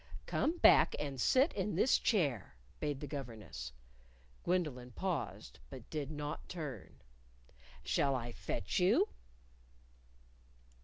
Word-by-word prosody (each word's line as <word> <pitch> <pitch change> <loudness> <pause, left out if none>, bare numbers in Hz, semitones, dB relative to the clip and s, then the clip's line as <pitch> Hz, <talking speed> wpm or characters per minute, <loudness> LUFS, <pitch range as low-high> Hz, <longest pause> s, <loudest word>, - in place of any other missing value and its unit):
"Come 330 +3 0
back - - +6
and 140 -3 -3
sit 265 - +4
in 200 -2 -1
this 230 +8 +4
chair," 145 - +1 0.2
bade 145 -3 -2
the - - -3
governess. 115 - -6 0.7
Gwendolyn 145 -9 -1
paused, 165 - -3
but - - -10
did 150 -3 -3
not 150 -1 -5
turn. 150 - -6 0.9
"Shall 140 -1 +2
I 120 -1 -3
fetch - - -2
you?" - - +4
145 Hz, 110 wpm, -35 LUFS, 125-175 Hz, 0.9 s, back